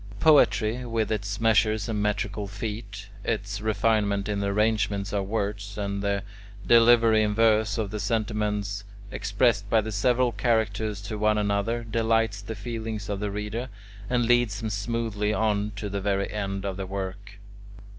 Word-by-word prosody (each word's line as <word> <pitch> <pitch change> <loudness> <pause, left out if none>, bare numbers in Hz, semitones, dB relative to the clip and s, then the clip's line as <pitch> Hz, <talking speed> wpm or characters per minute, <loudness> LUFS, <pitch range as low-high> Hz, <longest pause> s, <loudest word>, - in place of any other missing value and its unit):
Poetry, 125 -6 +4
with 115 -2 -1
its 105 -1 -2
measures 110 -1 +2
and 110 -2 -1
metrical 105 0 -1
feet, 105 -1 -6
its 105 -2 -2
refinement 105 -1 +1
in 105 -1 -1
the 100 - -1
arrangement 105 -1 0
of 100 -2 -1
words, 100 -1 -3
and 100 -1 -2
the 100 -1 -1 0.4
delivery 115 0 +6
in 105 -1 0
verse 110 -2 +3
of 105 -3 -2
the 105 - -4
sentiments 105 -2 -1 0.3
expressed 100 -1 +1
by 110 - +4
the 110 +1 -3
several 120 +4 +2
characters 110 -3 0
to 105 +2 -5
one 105 0 +3
another, 105 +3 0
delights 115 -2 +1
the 110 +2 -6
feelings 110 -1 -5
of 100 -1 -2
the 105 0 -2
reader, 105 +5 -4 0.4
and 120 -1 +2
leads 120 -4 +2
him 110 - -2
smoothly 105 0 -1
on 105 -1 0
to 105 +1 -4
the 100 0 -3
very 100 0 -1
end 100 -1 -3
of 95 -1 -3
the 95 -1 -4
work. 100 +1 -6
105 Hz, 160 wpm, -26 LUFS, 100-110 Hz, 0.4 s, delivery